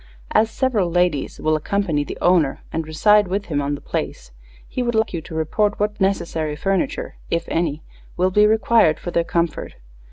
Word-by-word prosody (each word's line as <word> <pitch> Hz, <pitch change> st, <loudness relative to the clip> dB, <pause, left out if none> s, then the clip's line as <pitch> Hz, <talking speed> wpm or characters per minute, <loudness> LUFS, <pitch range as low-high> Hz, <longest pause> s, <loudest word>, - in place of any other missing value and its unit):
As 220 Hz, -, +3 dB
several 220 Hz, -7 st, 0 dB
ladies 175 Hz, -4 st, 0 dB
will 155 Hz, 0 st, +1 dB
accompany 160 Hz, -1 st, 0 dB
the -, -, -7 dB
owner 170 Hz, -6 st, +2 dB
and 160 Hz, -1 st, -2 dB
reside 210 Hz, +6 st, +4 dB
with 200 Hz, +3 st, -2 dB
him 145 Hz, -, +1 dB
on 145 Hz, +1 st, -1 dB
the -, -, -10 dB
place, -, -, -4 dB, 0.4 s
he -, -, -3 dB
would 240 Hz, -1 st, -1 dB
like 220 Hz, -1 st, +1 dB
you 170 Hz, -, -3 dB
to 160 Hz, +1 st, -10 dB
report 205 Hz, +7 st, 0 dB
what 210 Hz, 0 st, -1 dB
necessary 165 Hz, -5 st, 0 dB
furniture, 195 Hz, +3 st, -2 dB
if 170 Hz, 0 st, -1 dB
any, 160 Hz, -2 st, -1 dB, 0.3 s
will 185 Hz, +1 st, +2 dB
be 210 Hz, +2 st, +5 dB
required 220 Hz, -6 st, +3 dB
for 175 Hz, -, -5 dB
their 170 Hz, -, +1 dB
comfort. 170 Hz, -2 st, -2 dB
175 Hz, 185 wpm, -21 LUFS, 155-210 Hz, 0.4 s, be